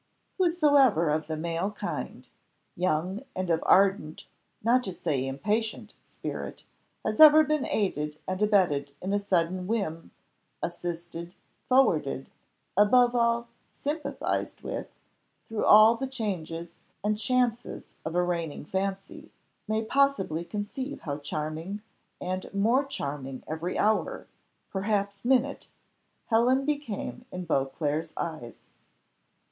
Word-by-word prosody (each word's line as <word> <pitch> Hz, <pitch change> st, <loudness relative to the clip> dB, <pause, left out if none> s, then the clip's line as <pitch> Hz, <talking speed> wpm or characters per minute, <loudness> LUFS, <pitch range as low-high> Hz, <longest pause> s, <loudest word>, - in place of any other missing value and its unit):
Whosoever 285 Hz, -, +4 dB
of 155 Hz, 0 st, -1 dB
the 160 Hz, -1 st, -3 dB
male 170 Hz, +4 st, -1 dB
kind, 210 Hz, -, -5 dB, 0.5 s
young, 180 Hz, +4 st, 0 dB
and 185 Hz, -2 st, -1 dB
of 165 Hz, -, +2 dB
ardent, 190 Hz, -5 st, +3 dB, 0.4 s
not 245 Hz, +3 st, +4 dB
to 190 Hz, -, -3 dB
say 140 Hz, -7 st, -1 dB
impatient, 210 Hz, +11 st, -2 dB, 0.2 s
spirit, -, -, -6 dB, 0.4 s
has 215 Hz, 0 st, -1 dB
ever 310 Hz, 0 st, +10 dB
been 305 Hz, -2 st, 0 dB
aided 150 Hz, -7 st, -1 dB
and 185 Hz, +1 st, -2 dB
abetted 170 Hz, -10 st, +2 dB
in 190 Hz, +2 st, -3 dB
a 205 Hz, -, +3 dB
sudden 180 Hz, -2 st, 0 dB
whim, 195 Hz, -7 st, -2 dB, 0.5 s
assisted, 170 Hz, 0 st, -5 dB, 0.3 s
forwarded, 160 Hz, -, +2 dB, 0.4 s
above 240 Hz, +5 st, +5 dB
all, 235 Hz, 0 st, +1 dB, 0.2 s
sympathised 300 Hz, +2 st, -3 dB
with, -, -, -4 dB, 0.6 s
through 220 Hz, -1 st, -2 dB
all 215 Hz, +2 st, +8 dB
the 270 Hz, +3 st, -3 dB
changes 175 Hz, -9 st, -4 dB, 0.2 s
and 210 Hz, 0 st, 0 dB
chances 245 Hz, -1 st, 0 dB, 0.2 s
of 160 Hz, +1 st, -4 dB
a 180 Hz, -, +3 dB
reigning 170 Hz, -5 st, -3 dB
fancy, 195 Hz, +2 st, -4 dB, 0.4 s
may 220 Hz, +1 st, 0 dB
possibly 220 Hz, -, +1 dB
conceive 210 Hz, +10 st, -5 dB
how 145 Hz, -1 st, -4 dB
charming, 155 Hz, +6 st, -4 dB, 0.4 s
and 185 Hz, +1 st, -4 dB
more 230 Hz, +7 st, +3 dB
charming 140 Hz, -, -5 dB
every 160 Hz, +3 st, -3 dB
hour, 220 Hz, -, +1 dB, 0.5 s
perhaps 200 Hz, 0 st, -1 dB
minute, 265 Hz, +2 st, +1 dB, 0.6 s
Helen 250 Hz, +4 st, +3 dB
became 280 Hz, -5 st, -3 dB
in 180 Hz, 0 st, -5 dB
Beauclerc's 150 Hz, +2 st, -1 dB
eyes. 155 Hz, -9 st, -4 dB
195 Hz, 115 wpm, -28 LUFS, 165-235 Hz, 0.6 s, ever